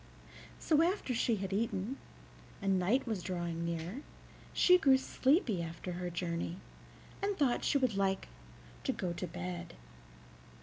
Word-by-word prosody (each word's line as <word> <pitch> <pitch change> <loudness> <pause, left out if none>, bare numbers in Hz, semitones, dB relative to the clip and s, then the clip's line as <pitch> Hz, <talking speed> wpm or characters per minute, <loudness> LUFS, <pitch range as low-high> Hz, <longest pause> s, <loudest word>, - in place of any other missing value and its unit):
So 310 -1 +3
after 340 -6 +1
she 230 0 +2
had 195 -1 -3
eaten, 220 +3 -1 0.6
and 195 -1 +2
night 215 +9 +2
was 220 -6 -2
drawing 175 -2 -3
near, 170 - -3 0.5
she 360 0 +6
grew 270 -6 +6
sleepy 265 - +2
after 170 +2 -5
her 180 0 -3
journey, 170 0 -3 0.6
and 400 0 0
thought 270 -5 +2
she - - +3
would 255 -5 +2
like 195 -1 0 0.6
to - - 0
go 175 -2 -2
to 175 +1 -4
bed. 85 - -6
195 Hz, 140 wpm, -33 LUFS, 175-260 Hz, 0.6 s, she